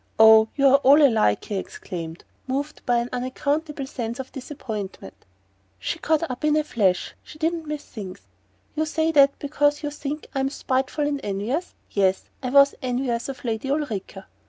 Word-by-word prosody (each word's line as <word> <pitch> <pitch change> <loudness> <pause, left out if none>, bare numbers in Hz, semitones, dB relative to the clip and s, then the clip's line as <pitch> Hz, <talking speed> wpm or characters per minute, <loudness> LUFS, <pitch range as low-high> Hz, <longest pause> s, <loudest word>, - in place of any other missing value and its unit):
"Oh, 220 0 +8
you're 275 -1 +6
all 280 +1 +6
alike!" 225 - +3
he 205 - -3
exclaimed, 165 -3 -6 0.2
moved 285 +4 -3
by 245 -1 +3
an 235 +1 -1
unaccountable 285 +4 -2
sense 240 -3 -5
of 265 - -6
disappointment. 225 - -6 0.6
She 95 - -3
caught 315 -1 +1
him - - -1
up 250 - -7
in 305 0 +3
a 305 - +2
flash 195 -11 0
she - - -13
didn't 325 0 -1
miss 300 -1 -5
things! 190 - -8 0.5
"You 315 +1 -1
say 320 +1 +1
that 280 -2 +5
because 290 +1 0
you 295 - -2
think 295 +1 -5
I'm 270 -1 0
spiteful 270 +2 -1
and 285 -1 -2
envious? 215 - -3 0.2
Yes 190 -2 +1
I 255 - -2
was 280 +1 +6
envious 250 -1 -1
of 260 -1 -7
Lady 225 +2 -2
Ulrica... 220 -9 -3
265 Hz, 170 wpm, -24 LUFS, 220-295 Hz, 0.6 s, Oh